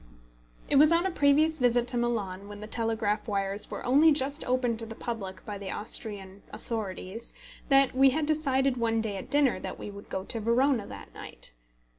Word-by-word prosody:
It 280 - +2
was 300 +3 +7
on 335 +2 +3
a 380 - 0
previous 310 +1 +3
visit 245 -1 +3
to 245 - -1
Milan, 200 -5 -2
when 205 0 -9
the 210 - -7
telegraph 220 -1 -1
wires 200 -1 -2
were - - -6
only 290 +6 +6
just 285 +1 +1
opened 250 -2 0
to 225 - -1
the 225 - -8
public 200 -6 -6
by 205 -2 -6
the 195 -1 -6
Austrian 200 -2 -4
authorities, 215 -1 -5 0.3
that 275 -1 +5
we 270 +1 +6
had 300 +3 0
decided 275 -4 +1
one 225 -1 +1
day 215 -3 -2
at - - -8
dinner 285 -3 +2
that - - -6
we 205 - -7
would 200 0 -12
go 190 - -3
to 225 - -2
Verona 235 +1 +2
that - - -10
night. - - -6
235 Hz, 195 wpm, -28 LUFS, 205-275 Hz, 0.3 s, was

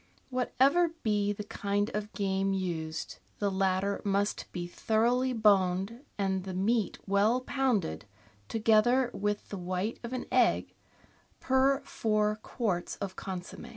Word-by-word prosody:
— - - -39
Whatever 280 +7 +2
be 205 -2 +1
the 205 0 -4
kind 205 0 -1
of 210 0 -3
game 195 -1 0
used, 165 -4 -3 0.2
the 205 -1 0
latter 190 +1 0
must 200 0 -1
be 175 -1 -4
thoroughly 235 +7 +1
boned 205 +1 +2
and 190 -2 0
the 190 -1 -5
meat 205 +1 +1
well 205 +5 +3
pounded, 250 - 0 0.4
together 230 +3 +3
with 205 +1 -2
the 200 - -5
white 185 +5 -2
of 235 - -5
an 255 -1 -3
egg 255 -2 +3 0.7
per 265 +1 +3
four 215 -1 0
quarts 195 -8 -2
of 195 -2 -5
consomm^. 190 +5 -7
205 Hz, 135 wpm, -30 LUFS, 190-235 Hz, 0.7 s, well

